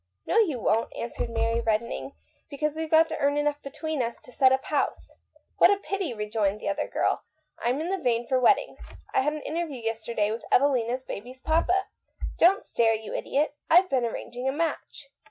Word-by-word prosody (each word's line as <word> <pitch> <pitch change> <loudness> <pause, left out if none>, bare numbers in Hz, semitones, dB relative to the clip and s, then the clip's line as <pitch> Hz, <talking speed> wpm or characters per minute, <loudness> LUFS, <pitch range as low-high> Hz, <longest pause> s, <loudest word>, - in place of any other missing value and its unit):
" 95 - -53
No, 435 - +3
you 320 - +2
won't," 225 +1 +1
answered 235 - -4
Mary, 230 0 0
redden 225 +1 0
ing, 275 - -6 0.4
"because 300 +1 -2
weVe 320 0 -3
got 320 +1 +6
to 315 - -3
earn 285 0 +2
enough 295 0 0
between 305 +1 -4
us 235 -1 -3
to - - -15
set 260 0 +4
up 265 0 +1
house." 295 - -1 0.3
" - - -41
Pooh," 395 - +2
rejoined 210 -1 -1
the - - -6
other 200 - -1
girl. - - 0 0.2
" 310 - -32
I'm 245 +4 +1
in 325 +3 -3
the 385 0 -1
vein 240 -3 +1
for 260 - +2
weddings. 250 - +3 0.3
I - - +4
had 295 +3 0
an 305 - -6
interview 320 -3 -3
yesterday 225 -2 -1
with 225 - -4
Evelina's 255 -2 +2
baby's 250 +3 -8
papa. 345 +4 +2 0.5
Don't 380 +4 +5
stare, 225 -1 +2
you 220 0 -7
idiot. 290 +2 0 0.2
I've 365 +3 +6
been 255 -3 +2
arranging 245 +2 -5
a - - +2
match." 295 -2 -4
265 Hz, 200 wpm, -27 LUFS, 230-315 Hz, 0.5 s, got